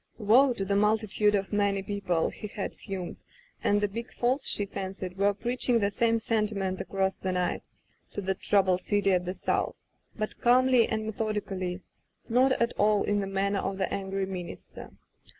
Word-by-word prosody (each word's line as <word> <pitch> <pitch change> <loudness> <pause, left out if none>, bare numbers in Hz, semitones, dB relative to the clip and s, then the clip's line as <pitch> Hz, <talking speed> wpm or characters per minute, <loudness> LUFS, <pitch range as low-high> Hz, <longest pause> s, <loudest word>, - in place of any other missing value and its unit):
" - - -36
Woe 240 +5 +5
to 195 -4 -3
the 200 +1 0
multitude 210 0 +2
of 195 +1 -2
many 200 -1 +1
people 200 -3 -2 0.2
^^^ - - -17
he 210 - -7
had 205 -1 -5
fumed, 190 -3 -6 0.5
and 205 0 +3
the 205 - +2
big 230 +4 -6
Falls, 255 +3 0
she 205 - 0
fancied, 190 -2 -6
were 200 +1 +3
preaching 240 +3 0
the 200 -2 +1
same 230 +2 +2
sentiment 210 -4 -1
across 190 -1 -1
the 190 - -2
night 180 -1 -1 0.5
to - - -4
that 190 0 -2
troubled 190 -3 +2
city 200 0 +2
at 180 -1 +1
the 180 +2 -3
south, - - -2 0.3
but 215 -1 -4
calmly 250 0 +5
and 220 -1 -1
methodically, 200 -4 -3 0.5
not 255 +3 +4
at 235 -1 0
all 210 0 +4
in 205 0 +1
the 195 - -2
manner 195 +1 0
of 195 - -3
the 190 - -1
angry 195 0 -2
minister. 185 -2 -8
200 Hz, 185 wpm, -28 LUFS, 195-220 Hz, 0.5 s, Woe